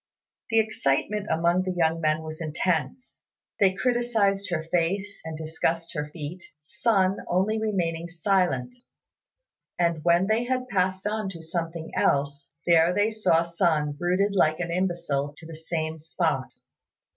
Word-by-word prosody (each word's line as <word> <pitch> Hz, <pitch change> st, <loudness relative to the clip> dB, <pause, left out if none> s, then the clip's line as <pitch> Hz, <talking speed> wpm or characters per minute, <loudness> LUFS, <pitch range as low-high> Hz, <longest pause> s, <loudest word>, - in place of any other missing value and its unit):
The 225 Hz, -1 st, +4 dB
excitement 210 Hz, 0 st, 0 dB
among 170 Hz, +2 st, +2 dB
the 185 Hz, 0 st, -2 dB
young 165 Hz, -1 st, +1 dB
men 155 Hz, 0 st, +1 dB
was 155 Hz, +1 st, -7 dB
intense; 165 Hz, -, -2 dB, 0.4 s
they 190 Hz, -2 st, +4 dB
criticised 220 Hz, -4 st, +1 dB
her 165 Hz, -3 st, -1 dB
face 180 Hz, +5 st, -1 dB
and 160 Hz, -1 st, -6 dB
discussed 160 Hz, +2 st, -2 dB
her 150 Hz, -2 st, -3 dB
feet, 165 Hz, +3 st, -7 dB, 0.2 s
Sun 190 Hz, +4 st, +1 dB
only 205 Hz, +5 st, +1 dB
remaining 170 Hz, -6 st, -1 dB
silent; 175 Hz, -, +1 dB, 1.0 s
and 170 Hz, -3 st, +1 dB
when 175 Hz, +2 st, +4 dB
they 220 Hz, +4 st, +1 dB
had 255 Hz, 0 st, -1 dB
passed 185 Hz, -1 st, 0 dB
on 210 Hz, -1 st, -1 dB
to 165 Hz, -4 st, -9 dB
something 165 Hz, 0 st, -4 dB
else, 140 Hz, 0 st, 0 dB
there 170 Hz, 0 st, +5 dB
they 210 Hz, +2 st, +2 dB
saw 210 Hz, -6 st, +2 dB
Sun 165 Hz, -4 st, 0 dB
rooted 185 Hz, +3 st, +1 dB
like 155 Hz, -5 st, +3 dB
an 175 Hz, -1 st, -2 dB
imbecile 170 Hz, -6 st, -1 dB
to 165 Hz, -, -12 dB
the 165 Hz, -, -9 dB
same 160 Hz, 0 st, -3 dB
spot. 160 Hz, -3 st, -1 dB
170 Hz, 145 wpm, -26 LUFS, 160-195 Hz, 1.0 s, there